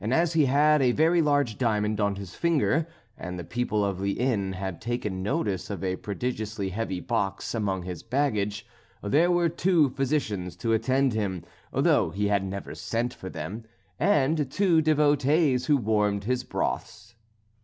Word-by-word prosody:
As 165 +4 +2
he 155 -3 +4
had 150 +3 +4
a 125 -2 +3
very 165 +4 +3
large 145 -7 +1
diamond 105 -3 0
on 100 -1 +1
his 100 -2 -8
finger, 160 -1 +1 0.3
and 90 0 -5
the 85 - -5
people 110 +1 -1
of 100 -2 -2
the 100 0 0
inn 105 -7 0
had 95 -1 -5
taken 110 -5 -3
notice 100 -1 -2
of 100 -2 -5
a 95 -1 0
prodigiously 110 -2 -3
heavy 95 -2 -3
box 100 -3 -2
among 100 -5 -1
his 90 -2 -6
baggage, 110 -5 -1 0.4
there 150 +12 +3
were 175 -1 +3
two 170 -2 +2
physicians 125 - -2
to 115 +6 -1
attend 130 +3 +2
him, 100 -5 -2 0.3
though - - +3
he 100 +4 -1
had 100 -1 +2
never 95 +1 -5
sent 120 +2 -2
for 95 - -8
them, 110 +5 -6 0.4
and 150 -5 +2
two 175 0 +3
devotees 145 -3 +2
who 145 - +4
warmed 105 -3 +1
his 125 +3 -1
broths. 105 -2 -4
115 Hz, 165 wpm, -26 LUFS, 100-145 Hz, 0.4 s, he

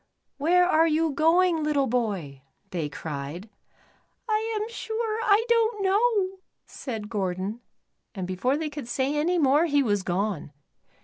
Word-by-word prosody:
"Where 355 +5 +4
are 325 -2 +4
you 320 0 +1
going, 325 +3 +3
little 295 -2 +2
boy?" 200 - -2 0.3
they 165 -5 -2
cried. 155 +7 -6 0.4
" - - -39
I 440 0 0
am 425 - -2
sure, 450 -1 -3
I 435 0 +3
don't 455 -3 +2
know," 390 -1 +2 0.3
said 220 -6 -6
Gordon, 195 +1 -3 0.5
and 190 -2 -3
before 185 +10 0
they 310 -1 -3
could 290 -5 -7
say 265 +4 -1
any 335 +5 +1
more 295 +1 +4
he 285 -2 +3
was 205 -5 +1
gone. 185 -4 -2
295 Hz, 145 wpm, -26 LUFS, -, 0.5 s, Where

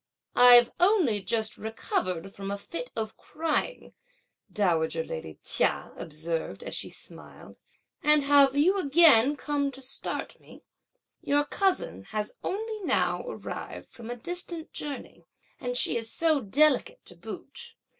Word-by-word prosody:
"I've 245 -1 +8
only 350 - +3
just 220 +4 -2
recovered 195 -4 -3
from 195 0 -6
a 200 - -2
fit 340 - -7
of 220 -1 -3
crying," 325 +10 -3 0.6
dowager 165 -5 +1
lady 80 - -7
Chia - - +1
observed, 160 - -4
as - - -6
she - - -3
smiled, - - -10 0.4
"and 300 -1 +4
have 280 -1 +5
you 365 +8 +3
again 290 -5 +6
come 285 -1 -1
to 270 0 -9
start 260 - -3
me? - - -16 0.6
Your 290 +1 +1
cousin 325 - 0
has 210 - -4
only 435 +2 -3
now - - 0
arrived 485 - -7
from 235 -2 -10
a 245 - -3
distant 340 +4 -5
journey, 290 -2 -6 0.3
and 245 0 -1
she 240 - +3
is 225 -1 -4
so 320 -3 +2
delicate 290 - +2
to - - -3
boot! - - -9
270 Hz, 135 wpm, -28 LUFS, 210-320 Hz, 0.6 s, I've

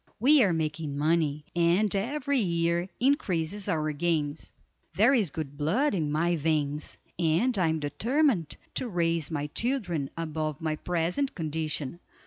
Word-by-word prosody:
We 280 +5 +6
are 200 -6 +4
making 155 -2 -2
money, 150 -1 +1
and 175 +5 +3
every 275 +6 0
year 170 -2 0
increases 205 - 0
our 155 -1 0
gains. 150 -1 -1 0.4
There 225 +7 +5
is 215 - +2
good 145 -1 -6
blood 210 - +2
in 155 -6 -1
my 170 +3 +1
veins, 150 -1 -1 0.2
and 175 +10 +2
I 180 -4 +2
am 160 0 0
determined 225 - 0 0.2
to 250 - -2
raise 165 -4 0
my 145 -3 -2
children 175 - -1
above 155 -2 -3
my 160 -2 -1
present 180 - -1
condition. 155 -2 -2
165 Hz, 140 wpm, -28 LUFS, 155-205 Hz, 0.4 s, We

